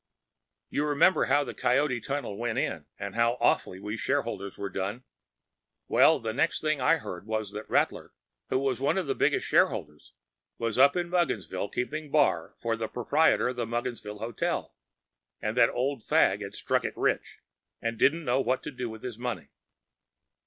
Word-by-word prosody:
You 150 - 0
remember 150 +5 +4
how 145 +3 +3
the 135 - -6
Coyote 130 -1 +1
Tunnel 135 -6 -3
went 120 +2 -2
in, 80 - -2
and 100 -1 -5
how 115 +1 +2
awfully 95 - +1
we 105 +3 -4
shareholders 115 -8 -2
were 100 -1 -4
done! 100 +6 -3 0.8
Well, - - +5
the 110 -1 -3
next 165 +7 +1
thing 155 -3 0
I 165 +6 +4
heard 95 - -8
was 110 -2 -2
that 105 +1 -7
Rattler, - - +1 0.4
who - - +2
was 130 -2 0
one 140 +7 +2
of 190 - 0
the 135 - 0
heaviest - - +1
shareholders, 75 0 0 0.4
was 115 0 -1
up 140 +1 +6
at 175 -1 0
Mugginsville 145 - -1
keeping 150 +5 -3
bar 140 - +2
for 115 -1 -1
the 115 -1 -3
proprietor 135 +4 +2
of 125 - -5
the 120 -2 -2
Mugginsville 120 -3 -4
Hotel, 115 +2 -3 0.7
and 110 +1 -2
that 125 -2 +5
Old 130 0 -1
Fagg - - +3
had - - -6
struck - - 0
it - - -4
rich, - - 0 0.4
and 115 -1 -3
didn’t 160 +7 +3
know 130 +1 +2
what 130 +1 0
to - - -5
do 125 -3 -4
with 110 0 -10
his 120 -3 -6
money. 120 - -4
120 Hz, 180 wpm, -28 LUFS, 110-140 Hz, 0.8 s, up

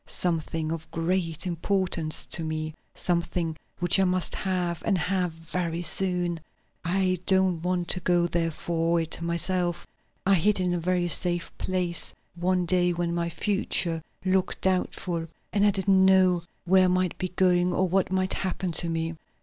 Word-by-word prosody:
"Something 165 -2 -1
of 160 -1 -5
great 165 0 -1
importance 175 -2 -1
to 170 - +1
me; 155 0 -3 0.2
something 170 -2 -1 0.2
which 175 +1 +4
I - - +5
must 185 -1 0
have 180 -3 -1
and 195 - +1
have 180 0 0
very 165 +1 -4
soon. 175 -1 0 0.4
I 185 +1 +1
don't 190 -3 +3
want 180 0 -1
to 180 - -1
go 175 -1 +2
there 170 -1 0
for 165 +1 0
it 165 0 -2
myself. 175 +1 -1 0.4
I 195 - +4
hid 195 +3 +3
it - - +1
in 180 -1 0
a 175 - -1
very 175 +1 0
safe 175 0 0
place 180 -3 -1 0.2
one 180 +1 0
day 180 0 +2
when 170 0 -2
my 170 0 -1
future 170 -2 0 0.2
looked 185 0 0
doubtful, 180 -2 -1 0.3
and 205 -1 +2
I 205 - +6
didn't 190 -1 +3
know 185 -2 +4 0.2
where 185 +1 +5
I - - +3
might 180 -1 +1
be 185 - -2
going 180 -1 +2
or 185 +1 +1
what 185 +1 +1
might 185 0 0
happen 185 -1 -2
to 170 +1 +2
me. 165 0 -2
175 Hz, 165 wpm, -26 LUFS, 170-185 Hz, 0.4 s, I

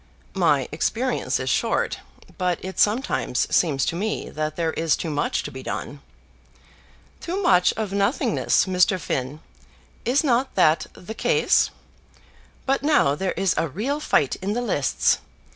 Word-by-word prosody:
"My - - +2
experience 255 +3 -1
is - - -1
short, - - 0 0.4
but 180 -1 +1
it 190 - -6
sometimes 210 - +1
seems 145 -6 +2
to - - -2
me 210 +5 -3
that 155 0 -3
there 165 -2 -1
is 165 -1 +1
too 165 - -4
much 145 0 -1
to - - -6
be 130 - -8
done." 140 +2 -5 1.2
"Too 360 +3 -3
much 180 - +4
of 215 -3 -3
nothingness, 200 +6 +1
Mr. 185 0 +2
Finn. 140 -1 -3 0.6
Is 265 +6 +2
not 260 -2 +1
that 155 +1 +3
the 215 +5 -9
case? - - +2 1.0
But 270 +1 +1
now 290 - +3
there 185 +5 -2
is 190 0 +1
a 165 - 0
real 255 - -2
fight 145 - +1
in 195 +2 -3
the 240 - -1
lists. 145 - +1
185 Hz, 150 wpm, -23 LUFS, 155-235 Hz, 1.2 s, much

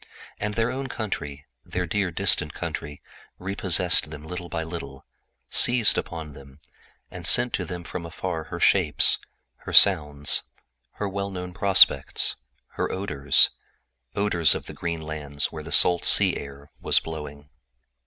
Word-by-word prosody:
And 105 0 -4
their 115 +1 0
own 135 +1 -5
country, 75 - -6 0.2
their 90 0 -4
dear, 100 +2 -2
distant 85 - +2
country, 75 0 -7 0.3
recaptured 90 -4 +2
them 75 0 -10
little 90 +1 -8
by 80 -1 -4
little, 70 -5 -9 0.5
seizing 120 -3 +4
on 80 -3 -8
their 70 - -12
imaginations, 70 +1 -19 0.4
and 85 -2 -7
sending 125 0 +3
to - - -3
them 90 -1 -7
from 85 +1 -7
afar 80 -1 -5
her - - -8
shapes, - - +3 0.4
her - - -10
sounds, 75 -6 +4 0.5
her 105 - -4
well 100 +1 -4
known 90 -2 -7
prospects, 100 0 +3 0.3
her - - -4
odors—odors 70 0 0
of - - -6
the - - -9
green 85 -2 -5
lands 75 -2 -4
where 80 - -8
the - - -10
salt 90 -1 +5
sea - - +3
air 70 +1 -10
was - - +2
blowing. 75 -3 -9
85 Hz, 145 wpm, -24 LUFS, 75-95 Hz, 0.5 s, salt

